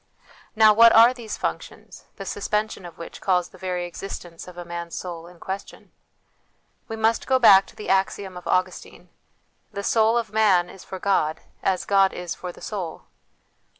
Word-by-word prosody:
Now, 215 -1 +7
what 230 +2 +7
are 230 +3 +7
these 235 -4 -7
func - - -2
tions, - - -14
the 195 - -8
suspension 210 -1 -2
of 170 - -14
which 170 - -10
calls 180 -2 +1
the 185 - -17
very 180 -1 -3
existence 175 -1 -8
of 180 -1 -12
a 175 - -7
man's 170 0 -6
soul 170 -2 -6
in 175 -1 -16
question? 190 +3 -7 1.0
We 225 - -5
must 225 +1 +1
go 260 - +4
back 195 -6 +7
to - - -17
the 210 - -8
axiom 195 0 0
of 180 - -9
Augustine 185 0 -2 0.3
" - - -45
The 200 - -5
soul 225 +2 +3
of 225 -3 -3
man 195 -5 +3
is 195 - -13
for 190 - -7
God, 165 -5 0 0.2
as 190 -1 0
God 195 -1 +3
is 180 -1 -5
for 180 - -7
the - - -17
soul." 185 -7 -5
190 Hz, 185 wpm, -24 LUFS, 175-215 Hz, 1.0 s, Now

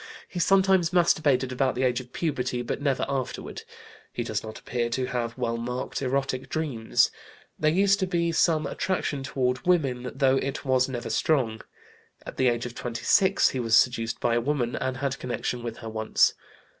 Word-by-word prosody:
He 180 - -6
sometimes 190 -1 +4
masturbated 155 -7 +2
about 130 +1 0
the 130 - -1
age 125 -1 +2
of 125 -1 -11
puberty, 130 -6 -2
but 120 - -4
never 140 -3 +1
afterward. 135 -2 -4 0.5
He - - -3
does - - -2
not 110 0 -8
appear 120 -1 -2
to 130 +2 -1
have 120 -1 -3
well 115 -2 -1
marked 125 +3 -4
erotic 135 0 -1
dreams. 140 -9 +1 0.5
There 155 - +3
used 195 +4 +3
to 190 - 0
be 170 -2 0
some 160 -2 +2
attraction 150 -3 -2
toward 130 -1 -1
women, 135 -8 +1
though 135 -1 +3
it 135 +2 -3
was 130 -1 +2
never 120 -3 -4
strong. 115 -4 +1 0.6
At - - -8
the 130 - +3
age 120 -1 0
of 120 - -6
26 125 +12 +2
he 130 - -3
was 115 -1 +4
seduced 115 -2 +1
by 120 - +1
a 120 - +2
woman 125 -2 -1
and 130 0 -2
had 140 0 -2
connection 125 0 -3
with 115 -1 -5
her 115 - -7
once. 110 0 +2
130 Hz, 180 wpm, -26 LUFS, 120-150 Hz, 0.6 s, sometimes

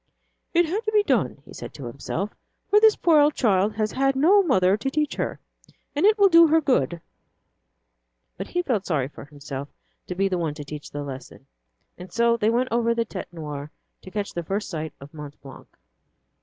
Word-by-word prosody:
"It 345 0 +4
had 390 +8 -2
to 430 - 0
be 420 -1 +4
done," - - 0
he - - -13
said - - -9
to 140 - -8
himself, 150 - -4 0.4
"for 415 - +7
the 440 0 +5
poor 300 -3 +6
child 210 -7 +1
has 215 -1 -1
had 270 0 +1
no 355 +10 +5
mother 195 - +3
to 215 +6 -2
teach 300 +1 -1
her, - - -3 0.6
and 300 +8 +4
it 430 +1 +4
will 405 -1 +6
do 335 -2 +7
her 320 +1 +4
good." 175 - +1 1.4
But 195 - -6
he 355 0 -1
felt 220 - -1
sorry 140 -6 0
for 150 - -11
himself 140 -1 -7 0.4
to 180 - -4
be 195 +2 +1
the 185 -2 -1
one 160 -3 -2
to 150 - -7
teach 150 0 -8
the 145 0 -5
lesson. 135 -2 -9 0.5
And 180 0 -10
so 235 +2 +3
they 220 -2 +1
went 245 +3 +1
over 235 0 +2
the 230 0 0
Tête 195 -4 -7
Noire 150 -3 -6 0.3
to - - -11
catch 205 +1 -4
the 170 - -3
first 195 +5 -3
sight 160 -2 -4
of 140 +2 -13
Mont 150 -2 -9
Blanc. 135 -1 -12
205 Hz, 205 wpm, -24 LUFS, -, 1.4 s, for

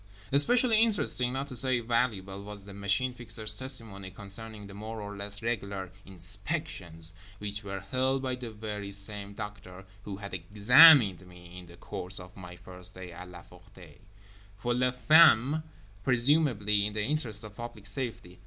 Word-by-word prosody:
Especially 225 - +4
interesting, 205 - +2
not 135 +2 -3
to 130 - -7
say 130 0 +3
valuable, 110 -5 -1
was 105 -1 -10
the 100 - -10
Machine 100 +6 0
Fixer's 115 -3 -2
testimony 115 -7 -1
concerning 105 +2 -6
the 100 - -11
more 110 +2 -7
or 105 0 -7
less 100 +1 -7
regular 100 -5 -3 0.2
"inspections" 95 - -4 0.2
(which 105 +1 -5
were 95 -1 -5
held 130 +6 0
by 130 -1 -1
the 125 -2 -6
very 105 -2 -6
same 100 0 -4
doctor 100 -3 -8 0.2
who 100 -1 -6
had 100 -1 -8
"examined" 105 - +6
me 90 0 -13
in 90 - -13
the 85 0 -15
course 90 +3 -5
of 90 0 -12
my 90 -2 -10
first 90 +1 -6
day 90 -1 -9
at 90 +1 -10
La 90 -1 -11
Ferté) 90 -3 -17 0.6
for 120 +4 -1
les 125 +1 +1
femmes; 155 -2 +6 0.4
presumably 120 -6 +3
in 105 - -6
the 105 0 -1
interest 120 -6 -1
of 105 -1 -10
public 120 -3 -8
safety. 100 -5 -5
105 Hz, 160 wpm, -29 LUFS, 95-125 Hz, 0.6 s, examined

